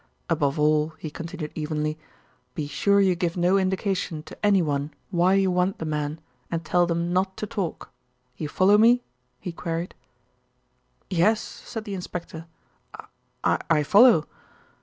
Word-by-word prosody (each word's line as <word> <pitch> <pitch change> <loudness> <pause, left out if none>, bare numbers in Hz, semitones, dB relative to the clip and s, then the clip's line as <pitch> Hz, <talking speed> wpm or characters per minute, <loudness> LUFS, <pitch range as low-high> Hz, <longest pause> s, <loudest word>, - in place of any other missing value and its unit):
Above 150 -2 +1
all," 150 +1 +2
he 155 - -7
continued 165 -1 -6
evenly, 155 0 -2 0.6
"be 155 - -2
sure 200 +8 +2
you 190 -2 +4
give 175 0 -2
no 180 +2 +3
indication 190 -4 -1
to 155 - -11
anyone 155 -8 +2 0.2
why 180 +1 +3
you 195 -1 +3
want 180 +2 +1
the 160 - -5
men, 150 0 -2 0.3
and 165 -1 -3
tell 175 +2 +2
them 170 +1 -1
not 190 +1 0
to - - -3
talk. 195 -5 -4 0.4
You 150 +1 -5
follow 200 +6 +4
me?" 240 +2 +5 0.4
he 180 - -5
queried. 165 +1 -4 1.2
"Yes," 190 +5 +3
said 225 -1 -8
the 205 - -5
inspector, 170 -3 -6 1.0
"I - - +2
I 155 -2 +3
follow." 205 - +6
175 Hz, 145 wpm, -25 LUFS, 155-190 Hz, 1.2 s, follow